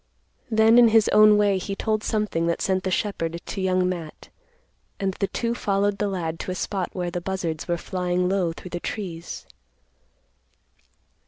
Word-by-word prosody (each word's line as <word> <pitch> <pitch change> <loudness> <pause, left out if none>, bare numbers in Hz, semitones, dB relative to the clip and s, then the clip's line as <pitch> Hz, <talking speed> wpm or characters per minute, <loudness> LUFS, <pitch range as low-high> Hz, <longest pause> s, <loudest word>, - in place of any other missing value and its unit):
Then 220 +1 +5
in 240 - +8
his 220 -1 +4
own 210 0 +7
way 200 -2 +3
he 195 +2 -4
told 215 +1 -1
something 210 -6 0
that 170 - 0
sent 190 -1 0
the - - +1
shepherd 170 -4 -2
to 195 - -4
Young 185 -1 +2
Matt, 170 -4 -6 0.7
and 195 -2 -1
the 195 - +1
two 235 +3 -2
followed 200 -2 0
the 205 - +1
lad 165 -4 -3
to - - -5
a 185 - -2
spot 190 -1 -2
where 175 -2 -3
the 175 - -3
buzzards 175 -4 -3
were 175 -1 0
flying 180 0 -1
low 185 -3 +1
through 175 +2 -10
the 175 - -3
trees. 170 -4 -6
190 Hz, 175 wpm, -24 LUFS, 175-210 Hz, 0.7 s, in